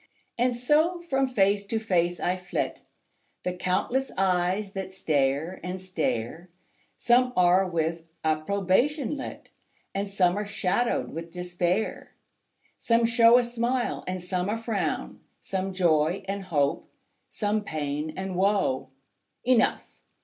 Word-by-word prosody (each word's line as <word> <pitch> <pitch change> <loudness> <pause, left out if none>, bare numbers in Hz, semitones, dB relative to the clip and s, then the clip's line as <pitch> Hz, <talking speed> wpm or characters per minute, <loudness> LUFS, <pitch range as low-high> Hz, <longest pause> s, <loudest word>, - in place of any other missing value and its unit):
And 245 0 +1
so 305 +8 +2
from 270 -6 0
face 200 -4 +2
to 225 - -1
face 175 -5 +1
I 180 - 0
flit, 180 -1 -3 0.6
The 180 - -1
countless 190 +9 -1
eyes 190 +2 +1
that 190 -1 -5
stare 150 -1 0
and 180 +1 -4
stare; 160 -3 -3 0.5
Some 250 +1 +3
are 180 +1 +4
with 165 0 -2
approbation 200 - +1
lit, 270 - -7 0.4
And 200 +1 -2
some 195 -1 +2
are - - -1
shadowed 205 +3 0
with 165 +1 -6
despair. 180 +3 -2 0.6
Some 230 0 +3
show 230 +1 +6
a 250 - +4
smile 240 +1 -1
and 185 -1 -3
some 180 +1 -2
a 220 - 0
frown; 225 -3 -2 0.2
Some 190 0 -3
joy 175 0 +2
and 195 0 -3
hope, 145 -6 0 0.4
some 210 0 -1
pain 150 -3 -3
and 190 -1 -4
woe: 190 -9 +1 0.5
Enough! 250 -2 +1
190 Hz, 130 wpm, -27 LUFS, 175-230 Hz, 0.6 s, show